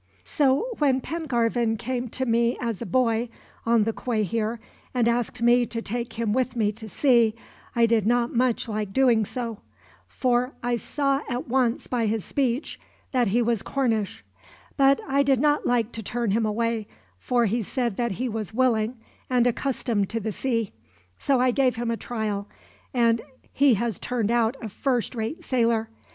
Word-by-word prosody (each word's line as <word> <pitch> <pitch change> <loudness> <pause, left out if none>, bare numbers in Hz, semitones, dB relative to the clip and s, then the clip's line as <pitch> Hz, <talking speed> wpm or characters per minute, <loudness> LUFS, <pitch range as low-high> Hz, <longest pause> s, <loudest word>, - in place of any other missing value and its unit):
"So 275 - +2
when 270 -3 +3
Pengarvan 240 -7 0
came 250 +2 -3
to 260 +3 -3
me 235 0 +2
as 230 -4 -3
a 235 - -4
boy, 235 -2 +1 0.4
on 230 -2 +4
the 225 +1 -1
quay 225 -3 -1
here, 225 +2 -2 0.4
and 240 -2 +3
asked 235 0 -1
me 240 0 +4
to 230 - -4
take 235 +2 -4
him 225 -2 -1
with 255 +1 0
me 215 -3 +2
to 220 +1 -10
sea, 235 0 +3 0.4
I 235 -1 +5
did 225 -3 +2
not 240 0 +2
much 245 -1 +1
like 210 -3 -3
doing 240 -4 +4
so; 230 -1 -5 0.5
for 245 - 0
I 240 0 +1
saw 275 +2 0
at 245 0 -3
once, 250 -1 +1
by 235 -3 0
his 215 -1 -1
speech, 265 0 -1 0.3
that 250 -3 +2
he 235 +5 +2
was 230 -3 +1
Cornish; 225 -7 -1 0.5
but 275 0 +4
I 275 +1 +3
did 275 -3 +3
not 295 +1 +2
like 240 -2 +1
to 225 - -6
turn 235 0 -2
him 220 +1 +1
away, 225 0 -1 0.3
for 240 - +1
he 230 +3 0
said 235 0 -2
that 235 -4 0
he 255 +7 -2
was 220 -2 -4
willing, 240 -2 +2 0.3
and 250 -2 +3
accustomed 235 -5 0
to 230 - -2
the 220 0 -3
sea. 230 -2 -1 0.5
So 270 -2 +2
I 255 0 +3
gave 255 -1 +2
him 230 0 -2
a - - 0
trial, 215 -4 -3 0.4
and 230 -3 +2 0.3
he 275 -3 +5
has 225 -1 -2
turned 235 -3 -1
out 235 +2 +2
a - - -3
first 245 +3 -1
rate 245 +10 -4
sailor. 230 -5 +1
235 Hz, 180 wpm, -25 LUFS, 225-255 Hz, 0.5 s, I